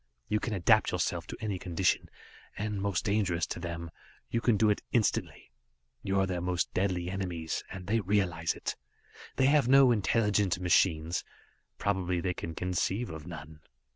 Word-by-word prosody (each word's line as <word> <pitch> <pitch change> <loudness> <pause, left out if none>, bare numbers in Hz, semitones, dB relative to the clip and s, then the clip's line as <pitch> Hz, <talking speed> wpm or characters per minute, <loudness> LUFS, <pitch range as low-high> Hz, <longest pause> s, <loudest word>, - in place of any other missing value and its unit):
You 105 - +1
can 110 - -3
adapt 90 - +4
yourselves - - -1
to - - -7
any 105 -4 -3
condition. 90 0 0 0.5
And 105 -1 -2
most 100 0 -1
dangerous 100 -6 +1
to - - -5
them 85 -1 -5 0.4
you 115 - 0
can 115 -3 +3
do 105 +1 +4
it 105 - -1
instantly. 115 -4 0 0.5
You 95 0 0
are 95 - +3
their 90 -2 -2
most 90 0 -1
deadly 90 -2 0
enemies, 90 -4 -3
and 90 -1 -8
they 110 +4 +1
realize 90 -5 0
it. - - -4 0.6
They 130 - +3
have 145 -2 +4
no 135 -1 +7
intelligent 105 -4 +2
machines; 85 -2 +2 0.5
probably 90 -3 0
they 90 +1 -1
can 80 -1 -6
conceive 90 +6 -1
of 80 0 -8
none. 80 -2 -9
95 Hz, 165 wpm, -30 LUFS, 85-105 Hz, 0.6 s, no